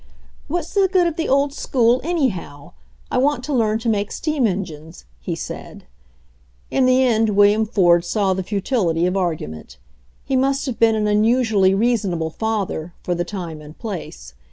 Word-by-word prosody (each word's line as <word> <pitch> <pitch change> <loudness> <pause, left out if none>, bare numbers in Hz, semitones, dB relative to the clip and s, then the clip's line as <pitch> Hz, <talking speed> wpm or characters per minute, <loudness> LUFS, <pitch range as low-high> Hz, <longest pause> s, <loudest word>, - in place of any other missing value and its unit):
"What's 335 +2 -3
the 390 -2 +3
good 370 -2 +3
of 335 -2 -1
the 325 - -2
old 275 +1 +2
school, 245 -3 +1
anyhow? 185 - -2 0.4
I - - +1
want 275 -1 +1
to 295 - -3
learn 220 -4 +2
to 230 +1 -5
make 205 -2 0
steam 305 -6 0
engines," 165 -5 -6
he 60 - -4
said. - - -8 0.9
In 260 -1 +3
the 255 +1 +4
end 225 -4 +2
William 205 +2 +4
Ford 175 -6 +3
saw 195 +1 0
the 190 - -2
futility 190 -3 0
of 180 +1 0
ar 180 -4 +1
gument. 75 - -10 0.5
He 270 - -1
must 275 +1 +1
have 255 -4 -4
been 225 -1 +4
an 215 -1 0
unusually 210 -2 +3
rea 235 +5 +2
sonable 170 -6 -3
father, 200 -7 -3
for 180 - -1
the 175 0 -1
time 175 -4 -6
and 150 +1 -13
place. 110 - -7
210 Hz, 180 wpm, -20 LUFS, 175-255 Hz, 0.9 s, the